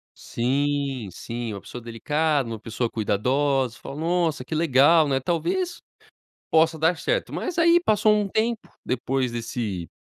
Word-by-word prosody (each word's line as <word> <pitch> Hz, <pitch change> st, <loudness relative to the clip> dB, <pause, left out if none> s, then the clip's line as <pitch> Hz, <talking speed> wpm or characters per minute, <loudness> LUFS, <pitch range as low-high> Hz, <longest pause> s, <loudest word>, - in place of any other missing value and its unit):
Sim, 135 Hz, -1 st, -1 dB
sim, 115 Hz, +1 st, -5 dB
uma 100 Hz, -, -7 dB
pessoa 125 Hz, -, -9 dB
delicada, 145 Hz, +4 st, 0 dB
uma 115 Hz, -1 st, -5 dB
pessoa 115 Hz, +2 st, -3 dB
cuidadosa, 130 Hz, +4 st, 0 dB
falo 140 Hz, +2 st, -7 dB
nossa 165 Hz, -5 st, 0 dB
que 130 Hz, -, -7 dB
legal 155 Hz, +1 st, +5 dB
né, 135 Hz, -1 st, +1 dB
talvez 345 Hz, -, -1 dB, 0.7 s
possa 160 Hz, 0 st, +3 dB
dar 160 Hz, +2 st, +2 dB
certo. -, -, -1 dB
Mas 360 Hz, -, -4 dB
aí 335 Hz, +1 st, +6 dB
passou 215 Hz, -, +3 dB
um 210 Hz, -1 st, 0 dB
tempo 220 Hz, +3 st, -1 dB, 0.2 s
depois 130 Hz, 0 st, -1 dB
desse 115 Hz, -6 st, -4 dB
140 Hz, 145 wpm, -24 LUFS, 120-170 Hz, 0.7 s, aí